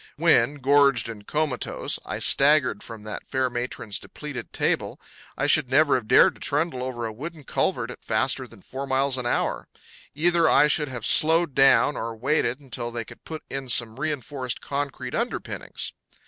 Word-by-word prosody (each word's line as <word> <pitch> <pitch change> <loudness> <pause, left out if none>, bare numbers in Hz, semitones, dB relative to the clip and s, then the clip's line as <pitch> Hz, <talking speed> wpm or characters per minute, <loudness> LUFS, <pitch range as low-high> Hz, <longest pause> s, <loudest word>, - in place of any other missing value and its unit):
When, 120 +5 +3
gorged 140 -3 +3
and 105 -3 -10
comatose, 150 -5 -2
I - - -3
staggered 140 -6 +3
from 115 -2 -10
that 105 -1 -7
fair 130 -1 -1
matron's 120 -4 -3
depleted - - -8
table - - -1 0.4
I - - 0
should 125 - +3
never 145 +2 +4
have 120 -4 -1
dared - - +5
to - - -19
trundle 145 -2 -1
over 125 -2 -4
a 110 - -5
wooden 155 +6 -8
culvert 125 -4 -1
at - - -13
faster 130 +4 0
than 115 -5 -17
four 135 +2 -6
miles 135 0 +2
an 120 - -3
hour. - - -1 0.5
Either 170 +1 +3
I - - +6
should 150 -1 +2
have 120 -4 -5
slowed 160 -1 +5
down 135 +2 +4
or 115 0 -5
waited 130 +1 -1
until 125 -4 -4
they 115 -1 -4
could - - -15
put 160 -1 -7
in 135 -1 -6
some 120 0 +3
re 155 +2 -1
enforced 130 -2 -4
concrete 140 -3 -4
underpinnings. 235 +2 -4
130 Hz, 175 wpm, -24 LUFS, 120-145 Hz, 0.5 s, I